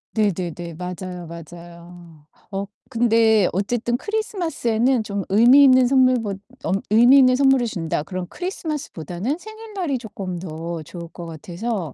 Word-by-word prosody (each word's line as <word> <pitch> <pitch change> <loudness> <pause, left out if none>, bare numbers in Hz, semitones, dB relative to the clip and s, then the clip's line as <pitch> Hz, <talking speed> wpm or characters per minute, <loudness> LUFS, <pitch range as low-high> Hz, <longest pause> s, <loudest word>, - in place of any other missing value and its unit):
네네네 175 -5 -1
맞아요, 180 0 -6
맞아요. 170 -1 -12 0.3
어 195 0 -3 0.2
근데 225 -4 +3
어쨌든 240 +5 -1
크리스마스에는 275 - 0
좀 200 -1 -3
의미있는 255 +5 +6
선물보 255 -6 +3 0.3
엄 195 +1 0
'의미있는 255 +4 +6
선물을 270 -3 +3
준다.' 165 -7 -2
그럼 185 +1 -5
크리스마스보다는 285 - -4
생일날이 415 -7 -5
조끔 200 -6 -6
더 165 -1 -5
좋을 170 +2 -9
것 170 +1 -9
같아서 170 - -5
210 Hz, 315 characters per minute, -22 LUFS, 175-255 Hz, 0.3 s, 의미있는